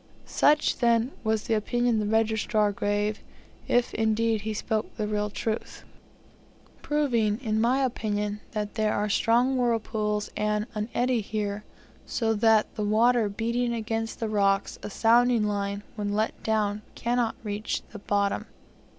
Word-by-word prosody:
Such, 300 +1 +3
then, 235 +1 +3
was 220 -1 0
the - - -1
opinion 240 +2 +1
the 210 - -1
registrar 220 -1 +2
gave, 205 +1 -1 0.5
if, 245 0 +2
indeed, 220 0 +1
he 220 +1 -3
spoke 215 +1 -1
the 215 - -1
real 210 0 -1
truth; 220 +2 -4 1.0
proving, 240 -8 +1
in 220 -4 0
my 255 +4 +2
opinion, 210 -4 -2
that 210 -1 -3
there 215 -1 +1
are 210 +1 0
strong 245 +5 +2
whirlpools 220 -3 -1
and 210 0 0
an 210 +1 -3
eddy 245 -1 +2
here, 205 0 -3 0.4
so 225 -2 0
that 220 0 +3
the 215 - -3
water 225 +1 +3
beating 235 +3 -1
against 225 0 -3
the 225 - -1
rocks, 200 -2 +1
a - - -6
sounding 235 +2 +3
line, 200 -1 -2
when 205 -2 -2
let 215 +1 -1
down, 210 -1 0
cannot 240 -1 0
reach 210 0 -3
the 210 - -8
bottom. 200 0 0
220 Hz, 145 wpm, -27 LUFS, 210-230 Hz, 1.0 s, Such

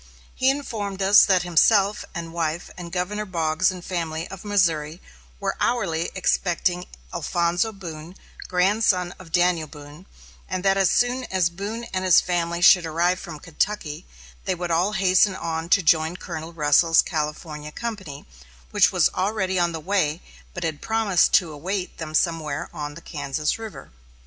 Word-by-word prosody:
He 260 - +2
informed 215 -8 -3
us 200 +2 +7
that 185 -2 +3
himself 195 +4 +3
and 165 -2 -6
wife 165 0 -3
and 175 -1 -8
ex 170 - -13
Governor 205 +4 -2
Boggs 165 0 +1
and 185 -2 -7
family, 165 -2 -3
of 195 -1 -9
Missouri, 170 -6 +1 0.4
were - - -2
hourly 175 -9 0
expecting 180 -1 0 0.3
Alphonso 175 +5 0
Boone, 170 -3 -9 0.3
grandson 185 -1 +2
of 175 -3 -13
Daniel 175 -2 +2
Boone; 150 +4 -13 0.4
and 185 0 -3
that 195 0 +4
as 195 -2 +3
soon 250 +4 +1
as 185 -5 0
Boone 205 +6 -5
and 185 0 -1
his 185 -2 +6
family 170 -1 -1
should 180 -2 +7
arrive 175 +3 +1
from 155 - -8
Kentucky, 155 - -3 0.4
they 185 - 0
would 175 0 -4
all 180 +5 +2
hasten 190 0 +3
on 165 -1 -4
to 195 - +4
join 160 +2 +2
Colonel 165 -2 -7
Russell's 165 +1 +4
California 150 -1 -4
company, 190 -10 -6 0.5
which - - +4
was - - +4
already 190 -1 -1
on 175 -1 +2
the 165 - -5
way, 170 -2 -1 0.3
but 175 - -4
had 155 -3 -3
promised 220 -5 +2
to 170 -4 +4
await 180 +5 -4
them 155 -1 -5
somewhere 160 -2 -1
on 145 -1 -6
the 170 - -10
Kansas 150 +2 -3
River. 220 -2 -9
175 Hz, 160 wpm, -23 LUFS, 160-195 Hz, 0.5 s, us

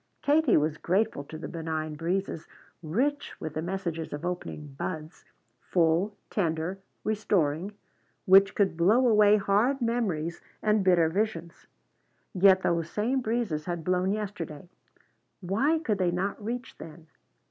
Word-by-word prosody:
Katie 295 -2 +4
was 150 0 0
grateful 190 -4 0
to 155 - -8
the 160 - -6
benign 160 -2 -4
breezes, 170 +1 -3 0.3
rich 255 - -1
with 160 - -5
the 155 - -3
messages 170 -2 -4
of 145 +3 -5
opening 175 -4 -5
buds, 155 +3 -6 0.3
full, 175 +6 +1
tender, 170 0 -1 0.2
restoring, 195 -4 0 0.5
which 195 +1 +6
could 200 -4 +2
blow 215 +10 +4
away 210 -2 +6
hard 210 +7 +2
memories 210 - -1 0.2
and 210 -1 +3
bitter 175 -3 +4
visions. 175 -2 -3 0.7
Yet 190 -1 +5
those 170 -1 0
same 245 +8 0
breezes 220 -10 -2
had 175 -2 -4
blown 185 +2 +1
yesterday. 190 -7 -5 0.7
Why 220 - +1
could 225 -11 -1
they 180 -2 +2
not 195 +4 -2
reach 240 +2 -5
then? 160 +1 -11
185 Hz, 135 wpm, -28 LUFS, 160-215 Hz, 0.7 s, which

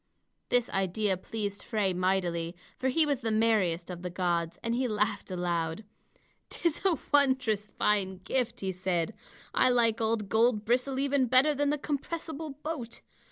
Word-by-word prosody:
This 245 -1 +2
idea 195 +1 0
pleased 205 +2 -4
Frey 210 -5 0
mightily, 180 -2 0 0.2
for 260 - 0
he 310 +5 +3
was 285 -4 0
the 225 - -2
merriest 210 -6 +2
of 175 -1 -7
the 180 - -4
gods, 175 -2 -1
and 230 0 0
he 255 +1 +1
laughed 210 -2 -1
aloud. 175 0 -2 0.7
"'Tis 335 -2 -1
a 370 -5 +3 0.2
wondrous 250 -7 +3
fine 195 -3 +1
gift," 245 -1 -1
he 190 -1 -1
said. 185 +1 -1 0.4
"I - - +4
like 230 -2 +2
old 220 -2 0
Goldbristle 235 +4 +2
even 275 -2 +2
better 260 +5 +5
than 290 0 +1
the 295 - +1
compressible 315 +2 -4
boat. 280 -8 -5
220 Hz, 155 wpm, -29 LUFS, 185-260 Hz, 0.7 s, better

